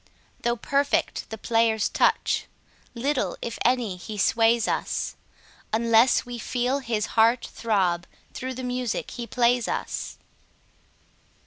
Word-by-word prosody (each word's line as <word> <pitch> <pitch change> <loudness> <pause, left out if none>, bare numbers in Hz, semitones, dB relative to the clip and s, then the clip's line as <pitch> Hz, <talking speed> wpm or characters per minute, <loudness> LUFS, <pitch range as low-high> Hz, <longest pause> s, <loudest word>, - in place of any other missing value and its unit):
Though 235 0 +1
perfect 280 +4 0
the 220 - -6
player's 225 0 +2
touch, - - +1 0.5
little, 265 +3 -1
if 235 - -5
any, 240 -6 +1
he 210 +4 -7
sways 225 +2 +3
us, - - -2 0.6
Unless 230 +3 +4
we 245 -1 -6
feel 250 +4 -1
his 225 -5 -1
heart 230 +2 +4
throb 185 -6 0 0.3
through 260 0 -5
the 255 - -6
music 250 -2 -2
he 240 -1 -6
plays 245 -1 +2
us. - - -4
235 Hz, 120 wpm, -25 LUFS, 220-250 Hz, 0.6 s, Unless